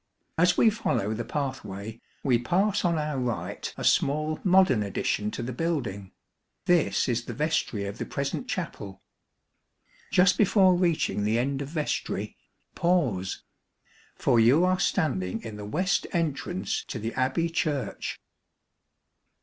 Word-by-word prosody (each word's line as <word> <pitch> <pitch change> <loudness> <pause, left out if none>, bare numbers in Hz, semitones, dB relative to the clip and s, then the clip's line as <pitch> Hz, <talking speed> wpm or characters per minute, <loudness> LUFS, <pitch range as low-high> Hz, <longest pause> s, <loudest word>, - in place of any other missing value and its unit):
As 180 +1 +4
we 225 - +5
follow 110 - -1
the 115 +2 -3
pathway, 110 -7 -5 0.2
we 125 -4 +3
pass 195 - +1
on 170 -2 +2
our 150 -3 -2
right 120 -3 -3
a - - -5
small 155 +2 +2
modern 185 - +4
addition 105 +1 -1
to 115 - -5
the 125 +2 -4
building 120 - -3 0.5
this 175 -5 +2
is 120 -1 -1
the - - -6
vestry 150 -9 -1
of 100 0 -6
the - - -2
present 140 - -3
Chapel. 105 - -5 1.1
Just 180 0 +4
before 195 -2 +5
reaching 170 - +1
the 110 +2 +1
end 135 +3 -1
of 140 - -4
vestry, 155 -1 -3 0.4
pause! 135 - 0 0.7
for 120 - +2
you 130 +10 +5
are 185 0 +2
standing 115 - 0
in 110 -2 -7
the 105 - -7
west 180 - 0
entrance 170 +1 -1
to - - -5
the 115 +1 -4
Abbey 130 +6 +1
Church. 155 -4 -2
140 Hz, 140 wpm, -27 LUFS, 115-175 Hz, 1.1 s, we